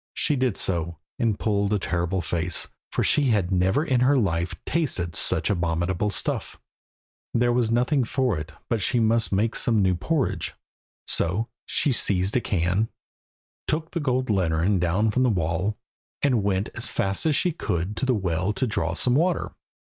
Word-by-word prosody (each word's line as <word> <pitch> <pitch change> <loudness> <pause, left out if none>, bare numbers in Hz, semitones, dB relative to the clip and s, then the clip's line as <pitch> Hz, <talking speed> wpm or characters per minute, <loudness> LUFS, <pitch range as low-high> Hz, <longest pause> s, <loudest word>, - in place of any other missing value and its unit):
She 150 - +1
did 130 -5 0
so, 85 -2 -1 0.2
and 110 -3 +1
pulled 100 -2 0
a - - +3
terrible 90 0 -1
face, 85 0 -1 0.2
for - - 0
she 150 - +3
had 105 -7 +1
never 95 - +2
in 130 -6 +2
her 135 +3 +4
life 90 -5 0
tasted 110 - -1
such - - +1
abominable 85 +2 0
stuff. 100 - -3 0.8
There 120 +1 +3
was 120 -2 +1
nothing 125 +4 +2
for 125 -2 0
it 75 +1 -7 0.2
but 115 -3 -1
she 120 +5 +2
must 115 0 +2
make 105 +4 +1
some 115 -3 +3
new 95 -1 +3
porridge. 135 - -1 0.5
So 100 +8 0 0.2
she 145 - +1
seized 100 -4 +1
a 125 - +3
can, 95 +3 0 0.8
took 160 +1 -1
the 170 - -2
gold 130 -4 0
lantern 90 0 +1
down 95 +6 +1
from 125 - +1
the 130 - +4
wall, 90 +2 -1 0.5
and 130 -6 +3
went 100 0 0
as - - +1
fast 95 +9 -1
as 155 - +2
she 180 - +2
could 90 - -3
to - - 0
the 130 - +3
well 95 0 -1
to 130 - -1
draw 85 -8 -1
some 125 - +1
water. 170 +6 +1
105 Hz, 175 wpm, -25 LUFS, 90-125 Hz, 0.8 s, her